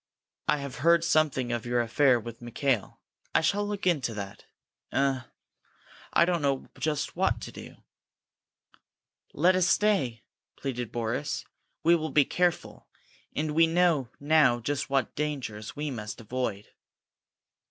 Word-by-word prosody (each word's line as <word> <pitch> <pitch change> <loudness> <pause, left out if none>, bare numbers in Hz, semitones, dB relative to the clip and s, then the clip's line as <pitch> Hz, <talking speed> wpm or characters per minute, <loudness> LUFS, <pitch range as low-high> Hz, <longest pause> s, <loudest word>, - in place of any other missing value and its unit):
"I - - +3
have 140 -2 -6
heard 170 +3 +4
something 155 -7 +2
of 120 -1 -2
your 120 0 0
affair 120 +2 +3
with 115 +1 -9
Mikail. 120 -2 -1 0.4
I - - +5
shall 205 +6 +1
look 205 -2 -4
into 140 -10 +1
that. 100 -2 -7 0.5
Eh 135 -1 +1 0.9
I 170 - +5
don't 175 -2 0
know 140 -2 0
just 155 -2 -1
what - - +1
to - - -7
do!" - - -10 1.6
"Let 180 +5 +3
us 185 -1 +3
stay!" 175 - +2 0.3
pleaded 125 -4 -4
Boris. 115 -1 -2 0.4
"We 170 +1 +6
will 160 -1 -2
be 145 -2 +4
careful, 180 -1 -1 0.5
and 155 +1 -1
we 165 +2 +5
know 165 -6 +2
now 145 -5 +4
just 140 +4 -2
what 135 -1 0
dangers 130 -8 -4
we 150 0 -3
must 110 0 -6
avoid." 115 -3 -3
140 Hz, 140 wpm, -28 LUFS, 120-160 Hz, 1.6 s, We